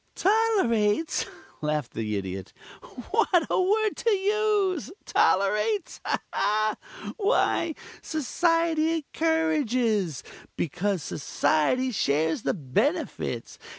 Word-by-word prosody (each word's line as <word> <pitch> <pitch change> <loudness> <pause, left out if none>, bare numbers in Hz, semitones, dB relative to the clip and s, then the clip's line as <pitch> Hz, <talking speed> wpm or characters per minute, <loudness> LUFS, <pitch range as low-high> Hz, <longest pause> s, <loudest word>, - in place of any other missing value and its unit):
"Tolerates?" 335 - +2 0.3
laughed 150 -4 -2
the 110 -1 -2
Idiot. 95 -1 -5 0.6
"What 375 -6 +3
a - - +3
word 425 +3 +2
to 465 - +1
use! 405 -4 +1
Tolerates? 210 - +1 1.2
Why, 395 -6 +1 0.3
Society 325 +1 +1
encourages, 255 - 0 0.3
because 180 +2 -1
Society 155 - +1
shares 160 - +1
the - - -1
benefits. 230 - -2
310 Hz, 80 wpm, -26 LUFS, -, 1.2 s, What